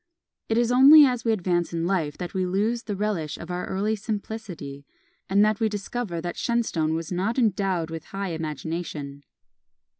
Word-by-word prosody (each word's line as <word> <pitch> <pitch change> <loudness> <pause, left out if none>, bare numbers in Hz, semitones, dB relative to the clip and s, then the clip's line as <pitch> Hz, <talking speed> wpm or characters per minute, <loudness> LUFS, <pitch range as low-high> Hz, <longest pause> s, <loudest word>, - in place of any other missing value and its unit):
It 225 - +1
is 240 0 +2
only 285 +4 +9
as 250 -3 0
we 230 - +2
advance 175 -5 0
in 165 0 -1
life 170 -6 -1
that 175 -1 -6
we 190 - 0
lose 215 +6 0
the 210 -3 -4
relish 190 -7 -2
of 170 - -8
our 180 0 -3
early 205 +3 0
simplicity, 200 -9 -6 0.5
and 200 +2 +5
that 215 -1 +1
we 220 -1 +2
discover 205 -2 -4
that 175 0 -5
Shenstone 175 -10 0
was 165 +1 -4
not 195 +7 -1
endowed 195 -8 +1
with 165 0 -6
high 195 -1 -4
imagination. 155 -2 -5
190 Hz, 175 wpm, -25 LUFS, 165-220 Hz, 0.5 s, only